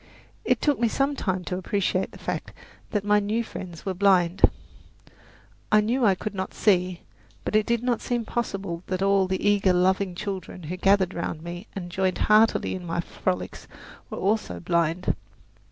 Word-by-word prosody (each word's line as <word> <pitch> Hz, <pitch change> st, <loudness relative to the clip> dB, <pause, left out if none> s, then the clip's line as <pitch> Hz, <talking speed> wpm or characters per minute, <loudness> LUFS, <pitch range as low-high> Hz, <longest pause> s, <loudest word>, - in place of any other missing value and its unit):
It -, -, +2 dB
took 290 Hz, -2 st, +2 dB
me 235 Hz, -, +3 dB
some 275 Hz, +5 st, 0 dB
time 185 Hz, -7 st, -1 dB
to 180 Hz, +1 st, -3 dB
appreciate 190 Hz, 0 st, 0 dB
the -, -, -12 dB
fact -, -, -4 dB, 0.4 s
that 205 Hz, -2 st, -1 dB
my 210 Hz, 0 st, +4 dB
new 215 Hz, +3 st, 0 dB
friends 175 Hz, -6 st, -8 dB
were 190 Hz, -, -1 dB
blind. 185 Hz, -1 st, +3 dB, 1.3 s
I 215 Hz, -, +7 dB
knew 235 Hz, +5 st, +1 dB
I 200 Hz, -4 st, +5 dB
could 210 Hz, +3 st, -5 dB
not 190 Hz, -1 st, -4 dB
see; 180 Hz, -3 st, +2 dB, 0.4 s
but -, -, -1 dB
it 215 Hz, 0 st, +3 dB
did 235 Hz, 0 st, +1 dB
not 245 Hz, -2 st, 0 dB
seem 240 Hz, -2 st, -1 dB
possible 195 Hz, -7 st, -3 dB
that 185 Hz, +1 st, -1 dB
all 195 Hz, -1 st, +3 dB
the 190 Hz, +2 st, -1 dB
eager, 200 Hz, -2 st, +4 dB
loving 185 Hz, +1 st, +2 dB
children 190 Hz, -2 st, -5 dB
who 165 Hz, +4 st, -4 dB
gathered 195 Hz, -1 st, +3 dB
round 165 Hz, -2 st, -4 dB
me 175 Hz, +4 st, -7 dB
and 175 Hz, -3 st, -5 dB
joined 185 Hz, 0 st, 0 dB
heartily 215 Hz, +1 st, +4 dB
in 185 Hz, -, -5 dB
my 170 Hz, 0 st, -2 dB
frolics 180 Hz, +1 st, -3 dB, 0.4 s
were -, -, -6 dB
also 200 Hz, -, 0 dB
blind. 170 Hz, -, +1 dB
190 Hz, 175 wpm, -25 LUFS, 180-210 Hz, 1.3 s, I